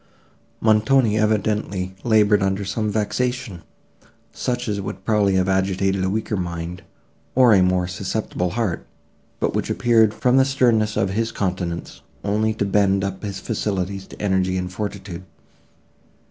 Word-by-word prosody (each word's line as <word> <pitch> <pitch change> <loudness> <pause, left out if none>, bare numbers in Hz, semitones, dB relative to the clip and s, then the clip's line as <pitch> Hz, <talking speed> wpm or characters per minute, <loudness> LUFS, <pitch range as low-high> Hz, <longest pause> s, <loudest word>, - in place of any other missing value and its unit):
Montoni 110 +1 +3
evidently 105 -3 0
laboured 105 -3 +4
under 95 +1 0
some 110 +2 -1
vexation, 110 -1 -2 0.7
such 125 -1 -2
as 100 -2 -1
would 95 0 -7
probably 105 -3 +2
have 95 0 +2
agitated 95 0 +1
a 95 - +1
weaker 110 +1 -2
mind 85 -1 -4 0.5
or 125 -3 +6
a 95 - +5
more 90 -1 +2
susceptible 95 -1 -2
heart, 110 -8 -2 0.5
but - - 0
which - - -2
appeared, 115 -3 +3
from 125 +4 +2
the 135 - +6
sternness 120 -5 +2
of 95 - +1
his 115 +3 -1
countenance, 90 -3 -3 0.2
only 105 +2 +1
to 105 - -1
bend 100 -1 +2
up 100 -1 -3
his 100 -2 -5
faculties 100 -3 -3
to - - -13
energy 95 -2 +1
and 90 0 -4
fortitude. 100 -3 -5
100 Hz, 145 wpm, -22 LUFS, 95-110 Hz, 0.7 s, or